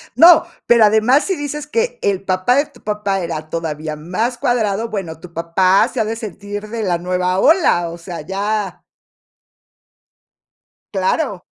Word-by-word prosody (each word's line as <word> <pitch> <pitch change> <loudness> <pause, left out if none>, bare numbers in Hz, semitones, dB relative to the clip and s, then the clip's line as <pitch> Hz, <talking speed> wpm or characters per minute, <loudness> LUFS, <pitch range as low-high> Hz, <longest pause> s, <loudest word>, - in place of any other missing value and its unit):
No, 340 0 +7 0.2
pero 235 -2 +6
además 220 +7 +3
si 380 - -1
dices 290 0 -5
que 470 +8 -1
el 195 -1 0
papá 185 +6 +1
de 285 +2 +2
tu - - -21
papá 210 -2 -2
era 155 -3 -5
todavía 155 -2 -4
más 220 +10 -2
cuadrado, 225 -3 0
bueno, 175 -7 -5
tu 170 -1 -13
papá 185 +3 +2
se - - -5
ha 220 - +2
de 220 +1 -3
sentir 205 -1 -7
de 230 -1 -4
la 175 -3 +1
nueva 180 +1 -1
ola, 290 - +3
o 170 - -8
sea, 170 -1 -7
ya 200 +2 -3 2.1
Claro. 190 - -1
200 Hz, 155 wpm, -18 LUFS, 175-235 Hz, 2.1 s, No